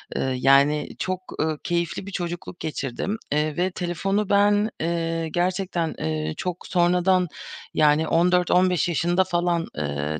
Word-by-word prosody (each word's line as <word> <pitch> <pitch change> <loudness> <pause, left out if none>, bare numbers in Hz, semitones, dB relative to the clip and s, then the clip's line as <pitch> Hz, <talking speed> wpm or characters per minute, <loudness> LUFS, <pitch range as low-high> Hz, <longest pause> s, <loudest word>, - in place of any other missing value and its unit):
Eee, 130 -1 0
yani 140 +3 +4
çok, 185 0 -2 0.2
ııı, 155 -1 -1
keyifli 170 +1 -2
bir - - -6
çocukluk 175 -1 -5
geçirdim, 155 - -3
eee, 150 +1 0
ve 185 +1 +1
telefonu 195 +4 -1
ben, 205 +1 +3
eee, 165 0 -1
gerçekten, 175 -1 -1
eee, 80 0 -2
çok 180 -1 -4
sonradan 180 +1 +3 0.5
yani 150 +1 +3
14-15 180 0 +3
yaşında 175 +3 +2
falan, 175 -2 0
eee, 75 +1 -2
175 Hz, 130 wpm, -24 LUFS, 150-180 Hz, 0.5 s, yani